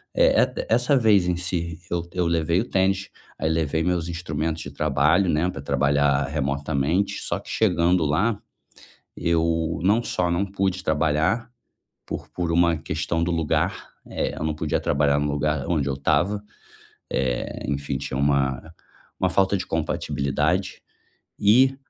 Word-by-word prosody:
é - - +5
é - - -1
essa 125 +5 +3
vez 105 -7 +4
em 90 - +1
si, 85 -2 -3
eu 85 -1 -1
eu 90 0 -1
levei 85 +1 +1
o - - -4
tênis, 95 0 +1 0.3
aí 80 - -1
levei 80 0 0
meus 90 -1 0
instrumentos 80 -1 -3
de 70 - -8
trabalho, 75 +6 +2
né, 80 +2 +2
pra 70 - -6
trabalhar 70 0 +2
remotamente 70 +5 -1
só - - -2
que - - -14
chegando 90 -4 +2
lá, 100 +9 +1 0.8
eu 80 -1 0
não 105 +5 +3
só 90 -6 -1
não 85 +3 +1
pude 95 -1 -2
trabalhar, 80 +9 +1 0.6
por - - -6
por 85 -2 -3
uma 85 0 +3
questão 80 +1 -2
do 90 - 0
lugar, 80 -3 -1 0.2
eh, - - -3
eu - - -4
não 80 0 0
podia 75 - -1
trabalhar 70 0 +2
no 75 0 0
lugar 75 0 -1
onde 75 -5 0
eu 70 - -1
estava, 90 +8 +1 0.7
eh, 65 -2 -2
enfim 70 -1 -2
tinha 65 -1 -4
uma 70 -2 +1 0.6
uma - - +3
falta 95 0 +2
de 95 - -4
compatibilidade 75 +5 -1 0.6
e 130 +6 +5
80 Hz, 155 wpm, -24 LUFS, 75-90 Hz, 0.8 s, é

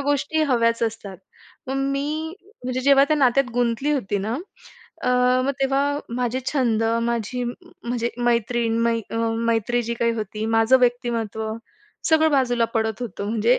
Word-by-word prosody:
गोष्टी 290 +2 0
हव्याच 230 -4 +2
असतात, 220 -4 -3 0.5
मग 265 - -2 0.2
मी 305 +4 -2 0.3
म्हणजे 255 0 -2
जेव्हा 275 +1 +6
त्या 310 - +3
नात्यात 275 0 +4
गुंतली 245 +4 +1
होती 210 -7 -1
ना, 215 +4 -2 0.7
अ, - - 0 0.4
मग 275 - +1
तेव्हा 280 +2 +1 0.2
माझे 250 +1 -1
छंद 235 -6 +1 0.2
माझी 235 +1 -2
म्हणजे 240 -4 -4
मैत्रीण 235 -1 +1
मै 230 0 +2
अ - - -4 0.3
मैत्री 230 +1 +1
जी 235 0 -3
काही 235 0 +1
होती, 215 0 -4
माझं 225 +3 +4
व्यक्तिमत्त्व 230 -3 0 0.6
सगळं 315 0 +5
बाजूला 245 -4 +2
पडत 220 +1 -1
होतं, 205 -3 -5
म्हणजे 230 +3 +3
240 Hz, 145 wpm, -23 LUFS, 225-270 Hz, 0.7 s, जेव्हा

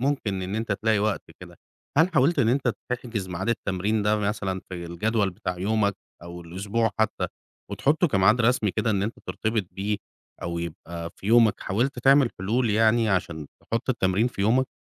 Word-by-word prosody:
ممكن 120 -9 -1
إن 95 +3 -4
أنت 110 -1 -1
تلاقي 110 +1 +1
وقت 105 0 0 0.2
كده، - - -12 0.4
هل 165 +3 +6
حاولت 145 +4 +3
إن 115 -4 +4
أنت 125 -2 +2 0.2
تحجز 115 -6 -3
ميعاد 90 +5 -4
التمرين 105 -1 0
ده 105 +1 +2
مثلًا 100 -3 -2
في 90 -2 -6
الجدول 100 +4 0
بتاع 90 0 -5
يومك 100 +1 +1 0.3
أو 85 0 -8
الأسبوع 100 +6 -1
حتى، 110 - +1 0.4
وتحطه 155 +4 +2
كميعاد 105 +2 +4
رسمي 115 -3 +2
كده 110 +4 0
إن 100 -2 +1
أنت 110 +3 -2
ترتبط 110 -2 -1
بيه 100 +2 -2 0.5
أو 85 -1 -3
يبقى 85 0 -6
في 95 - -10
يومك، 115 -1 +5
حاولت 120 +6 -1
تعمل 135 0 +5
حلول 110 +5 +1
يعني 110 +1 +3
عشان 85 -6 -1 0.2
تحط 115 +3 -3
التمرين 100 -1 +1
في 100 - -8
يومك؟ 125 +6 +3
105 Hz, 175 wpm, -25 LUFS, 95-115 Hz, 0.5 s, هل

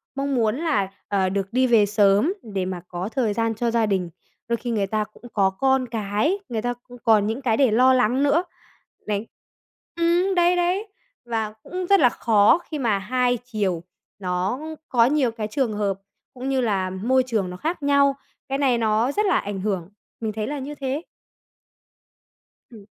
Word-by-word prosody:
mong 275 0 -1
muốn 225 -1 +1
là, 285 - 0 0.2
ờ, 195 -2 +1
được 195 +2 -3
đi 255 +1 +3
về 225 -4 +5
sớm 205 - +3
để 200 -4 -3
mà 185 -2 -4
có 180 +3 -4
thời 230 -4 0
gian 225 0 0
cho 235 +1 -1
gia 230 -1 +2
đình. 190 -4 -1 0.4
Đôi 235 0 0
khi 240 - -6
người 205 -4 0
ta 215 +1 0
cũng 215 - -22
có 195 -2 +3
con 265 +4 +1
cái, 225 - -1
người 225 -2 -2
ta 245 +1 -1 0.2
cũng 245 - -11
còn 215 -3 +4
những 225 +5 -3
cái 230 -4 +1
để 265 -4 +4
lo 255 +4 +5
lắng 250 +2 +2
nữa. 290 +5 +3 0.6
Đấy, 210 +1 -2 0.7
ừm, 345 +3 +2
đấy, 350 0 +4
đấy. 360 +5 0 0.4
Và 220 -3 -2
cũng 365 0 -4
rất 395 0 +6
là 250 - +6
khó 220 +4 +4
khi 305 - -4
mà 230 -6 +1
hai 245 +4 +1
chiều 200 -8 -2 0.4
nó 185 +5 -1 0.3
có 235 -2 +4
nhiều 270 -3 +2
cái 220 -2 -4
trường 230 0 -1
hợp 200 -2 -1 0.3
cũng 260 +1 -5
như 265 -1 +1
là 195 -5 0
môi 235 +8 +1
trường 210 -7 -1
nó 180 - -7
khác 320 - -3
nhau. 280 -1 +4 0.3
Cái 275 - 0
này 265 -4 +2
nó 225 +3 +1
rất 420 +7 0
là 385 - +3
ảnh 200 -2 -4
hưởng. 190 -4 -2 0.3
Mình 220 -2 -2
thấy 215 0 -3
là 290 0 -3
như 285 +2 -6
thế. 275 +1 -3 1.7
Ừm. 215 -4 -14
230 Hz, 195 wpm, -23 LUFS, 205-270 Hz, 1.7 s, rất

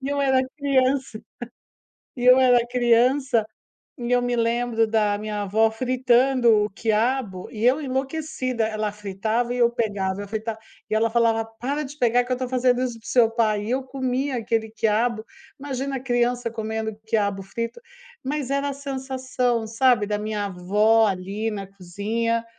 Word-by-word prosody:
E 270 - -3
eu 285 0 -1
era 265 -1 +3 0.2
criança, 265 -4 +1 1.0
e 245 - -2
eu 255 +1 +8
era 250 -2 +5
criança, 245 0 +2 0.5
e 240 0 -4
eu 245 0 +4
me 245 0 0
lembro 230 -1 +1
da 210 -2 +1
minha 210 0 -4
avó 220 +3 +2
fritando 250 -1 +3
o 210 - -5
quiabo, 220 -2 -1
e 220 +1 -3
eu 265 +5 +4
enlouquecida, 265 -3 -2
ela 215 -1 -2
fritava 210 +4 -2
e 250 - -3
eu 235 -1 +5
pegava, 205 -5 -2
ela 205 - -7
frita 220 +1 -4 0.3
e 215 - 0
ela 225 +1 +2
falava: 225 -1 +2
“Para 250 +7 -4
de 290 +3 -10
pegar 245 -1 +3
que 255 - -7
eu - - +3
estou 255 0 -3
fazendo 255 -1 +2
isso 240 -3 -4
para - - -23
o - - -5
seu 240 -3 +4
pai,” 215 -3 +1
e 235 - -2
eu 260 +1 0
comia 260 0 -2
aquele 225 -1 -1
quiabo, 220 +1 0 0.3
imagina 275 -1 -3
a - - -5
criança 245 -1 0
comendo 220 -1 -4
quiabo 200 -3 0
frito, 230 - -5 0.4
mas 280 -1 -3
era 280 +1 0
a - - -3
sensação, 260 -4 -2
sabe, 230 -1 +3
da 210 - -1
minha 210 -1 -3
avó 210 +4 +3
ali 200 +4 -3
na 200 -2 -5
cozinha, 210 +5 -2
235 Hz, 175 wpm, -23 LUFS, 215-255 Hz, 1.0 s, eu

